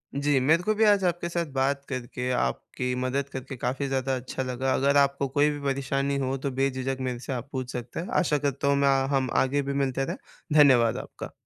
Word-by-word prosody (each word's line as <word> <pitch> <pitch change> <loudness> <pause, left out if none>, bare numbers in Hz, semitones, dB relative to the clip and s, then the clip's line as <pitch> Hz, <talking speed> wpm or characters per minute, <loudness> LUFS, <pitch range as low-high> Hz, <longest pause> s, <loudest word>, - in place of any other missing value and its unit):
जी, 140 0 +2
मेरे 160 +7 +3
को 215 - +2
भी 220 - +2
आज 205 -2 +5
आपके 175 -1 0
साथ 170 0 -1
बात 140 +1 0
करके, 125 -1 -4
आपकी 125 - -2
मदद 135 +2 -1
करके, 130 +1 -6
काफ़ी 130 +4 -2
ज़्यादा 135 0 0
अच्छा 130 +1 -4
लगा। 130 +1 -1
अगर 140 +1 +3
आपको 140 0 +2
कोई 145 +3 +2
भी 145 - -4
परेशानी 140 0 -1
हो 135 0 -1
तो - - -1
बेझिझक 135 -1 0
मेरे 125 -2 -2
से 130 +2 -5
आप 125 +2 -5
पूछ 130 -2 -4
सकते 120 +4 -5
हैं। 175 - -4
आशा 160 -5 +2
करता 140 -1 -1
हूँ, 140 - +4
मैं 140 0 +3 0.3
हम 130 -2 +1
आगे 140 +2 0
भी 140 0 -3
मिलते 135 -1 0
रहें। - - -4 0.4
धन्यवाद 130 -7 +5
आपका। - - -9
135 Hz, 215 wpm, -26 LUFS, 130-140 Hz, 0.4 s, आज